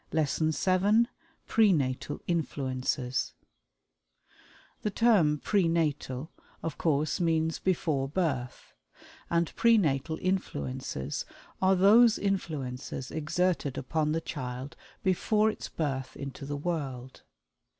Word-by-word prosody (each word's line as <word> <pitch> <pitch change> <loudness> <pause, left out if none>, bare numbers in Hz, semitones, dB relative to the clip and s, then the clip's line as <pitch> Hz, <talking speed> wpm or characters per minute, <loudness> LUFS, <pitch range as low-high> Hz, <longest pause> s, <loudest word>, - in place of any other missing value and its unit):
LESSON 155 0 +1
VII 190 - +3 0.4
PRE 220 -3 +4
NATAL 130 -6 -1
INFLUENCES 130 -5 -1 1.5
The 210 - 0
term 195 -9 +4
"Pre 195 +3 +2
Natal" 150 -4 -1 0.3
of 165 -2 -4
course 155 -2 +1
means 160 -2 +1
"before 155 -7 0
birth," 140 -6 -2 0.6
and 170 0 0
Pre 230 -1 +5
Natal 160 -3 0
Influences 70 - -2 0.4
are 190 0 +5
those 215 +5 +6
influences 145 -10 -3
exerted 160 -2 0
upon 150 +3 0
the 165 +1 0
child 130 -1 -5 0.3
before 210 +3 +2
its - - -8
birth 135 -4 -3
into 140 0 -7
the 145 0 -3
world. 140 -6 -4
160 Hz, 105 wpm, -29 LUFS, 135-185 Hz, 1.5 s, those